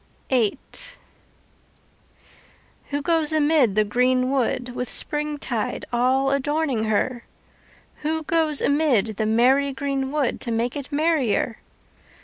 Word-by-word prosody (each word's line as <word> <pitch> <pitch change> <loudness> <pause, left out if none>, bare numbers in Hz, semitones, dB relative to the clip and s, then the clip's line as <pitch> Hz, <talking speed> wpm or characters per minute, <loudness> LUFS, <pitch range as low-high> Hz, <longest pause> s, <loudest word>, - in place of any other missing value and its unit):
VIII 235 -5 +2 2.3
Who 285 0 -2
goes 325 -1 +1
amid 295 -8 +3
the 215 - +4
green 255 +4 +1
wood 250 -2 -1
With 250 0 -4
springtide 295 -7 -2
all 260 +3 +2
adorning 280 -4 0
her? 230 +3 -1 0.7
Who 315 +1 -2
goes 315 -2 +3
amid 265 -8 +2
the 215 - 0
merry 260 +5 +3
green 275 0 -3
wood 290 -5 -1
To 235 - -3
make 230 +2 -1
it 285 0 -6
merrier? 285 -7 0
270 Hz, 115 wpm, -23 LUFS, 240-295 Hz, 2.3 s, the